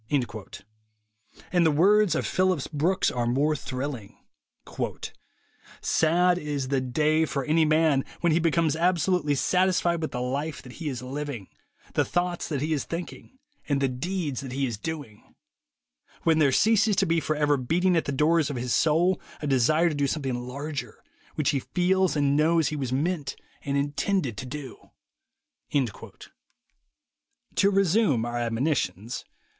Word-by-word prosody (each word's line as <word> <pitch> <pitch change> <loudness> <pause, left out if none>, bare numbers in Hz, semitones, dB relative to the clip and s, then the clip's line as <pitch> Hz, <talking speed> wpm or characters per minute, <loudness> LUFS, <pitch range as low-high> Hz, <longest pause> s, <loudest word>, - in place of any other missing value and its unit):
And 175 -1 +4
the 160 - +4
words 195 +6 +4
of - - -1
Phillips 185 -6 +1
Brooks 165 +6 +1
are 120 -1 -1
more 145 +6 +2
thrilling: 130 -6 -5 1.6
"Sad 175 +3 +2
is 145 -4 -3
the 135 -1 +1
day 155 +5 +1
for 140 -3 -2
any 160 +1 +3
man 155 -3 +3 0.2
when 170 - +3
he 160 - +3
becomes 165 -2 +2
absolutely 175 -2 +1
satisfied 175 +1 +1
with 155 - -2
the 125 - -4
life 140 +4 -3
that 125 - -11
he 155 - -2
is 125 -3 -5
living, 135 -6 -5 0.4
the - - +2
thoughts 175 0 -1
that 145 -4 -2
he 155 +2 0
is 145 - -1
thinking 175 +9 -7 0.3
and 140 -1 +2
the 135 - +2
deeds 145 +1 -3
that 130 -2 -7
he 135 +1 0
is 120 -3 -3
doing; 145 -8 -7 0.9
when 160 -1 +3
there 145 -3 +4
ceases 215 - +3
to - - +2
be 165 0 +2
forever 150 -2 +1
beating 170 +8 +1
at 165 - +1
the 140 - -2
doors 150 +3 +2
of 145 - -4
his 125 0 -2
soul 170 +4 +2 0.2
a - - -5
desire 145 +5 +3
to - - -3
do 145 -1 0
something 135 -2 -2
larger, 140 +3 -6 0.3
which 150 -3 +1
he 140 - 0
feels 185 +4 +1
and 145 -1 +2
knows 160 +1 +3
he 155 - -4
was 135 -4 -3
meant 150 +1 -1 0.3
and 140 0 -2
intended 145 - -1
to 125 - -6
do." 140 -1 -8 2.7
To 200 - +4
resume 195 - +2
our 120 0 -3
admonitions. 115 - -2
150 Hz, 155 wpm, -26 LUFS, 135-170 Hz, 2.7 s, And